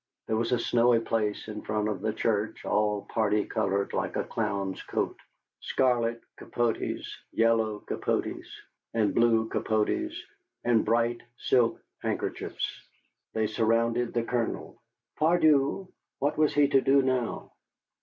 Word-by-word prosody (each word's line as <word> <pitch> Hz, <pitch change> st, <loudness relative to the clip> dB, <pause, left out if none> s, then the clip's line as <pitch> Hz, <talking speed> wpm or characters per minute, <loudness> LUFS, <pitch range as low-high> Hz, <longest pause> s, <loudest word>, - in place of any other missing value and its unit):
There 110 Hz, -, -1 dB
was 115 Hz, +2 st, 0 dB
a 125 Hz, -, +3 dB
snowy 120 Hz, 0 st, +3 dB
place 110 Hz, -2 st, -1 dB
in 105 Hz, -1 st, -6 dB
front 105 Hz, 0 st, -1 dB
of 105 Hz, -, -3 dB
the 110 Hz, -, 0 dB
church 105 Hz, -1 st, -1 dB
all 105 Hz, -1 st, +1 dB
party 105 Hz, -2 st, +1 dB
colored 100 Hz, 0 st, -1 dB
like -, -, -2 dB
a -, -, 0 dB
clown's 100 Hz, -3 st, -2 dB
coat, -, -, -2 dB, 0.4 s
scarlet 120 Hz, -2 st, +1 dB, 0.2 s
capotes, 120 Hz, -1 st, -1 dB, 0.3 s
yellow 115 Hz, -2 st, +2 dB
capotes, -, -, -2 dB, 0.5 s
and 110 Hz, -3 st, +2 dB
blue 115 Hz, -1 st, +3 dB
capotes, 110 Hz, -, 0 dB, 0.5 s
and 115 Hz, -2 st, +3 dB
bright 120 Hz, +1 st, +1 dB, 0.2 s
silk 120 Hz, -3 st, +2 dB, 0.2 s
handkerchiefs. -, -, -3 dB, 0.5 s
They 110 Hz, 0 st, +1 dB
surrounded 115 Hz, +2 st, +1 dB
the 120 Hz, -, +2 dB
Colonel. 115 Hz, -1 st, -3 dB, 0.4 s
Pardieu, 155 Hz, +1 st, +3 dB, 0.3 s
what 145 Hz, +2 st, 0 dB
was 155 Hz, -1 st, +2 dB
he 145 Hz, -1 st, +5 dB
to 135 Hz, -2 st, +4 dB
do 135 Hz, +1 st, +4 dB
now? 130 Hz, -3 st, -1 dB
115 Hz, 130 wpm, -28 LUFS, 110-125 Hz, 0.5 s, he